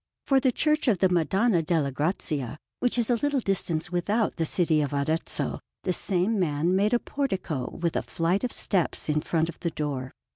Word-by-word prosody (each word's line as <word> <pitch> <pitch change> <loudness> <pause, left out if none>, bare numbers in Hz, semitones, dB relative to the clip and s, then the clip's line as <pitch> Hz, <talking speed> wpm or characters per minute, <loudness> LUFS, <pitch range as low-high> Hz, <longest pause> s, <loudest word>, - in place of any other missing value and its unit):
For 270 -1 +4
the 260 -1 +2
Church 305 +3 +1
of 220 -6 +4
the 190 +1 +3
Madonna 180 +3 +2
delle 155 -3 0
Grazie, 145 -2 -2 0.2
which 245 0 +1
is 235 0 +1
a 240 - +3
little 290 +2 +1
distance 180 -5 -1
without 205 +5 0
the 165 -2 0
city 160 -3 +2
of 145 -1 -2
Arezzo, 155 +3 -1 0.2
the 185 - 0
same 195 +4 0
man 165 +1 +1
made 210 +5 +3
a - - +5
portico 190 - -2
with 170 -1 -2
a - - +1
flight 170 +6 -1
of 250 - -1
steps 180 -5 0
in 150 0 +2
front 165 +1 0
of 170 - -8
the 170 - -1
door. 140 -5 -4
175 Hz, 195 wpm, -27 LUFS, 155-215 Hz, 0.2 s, a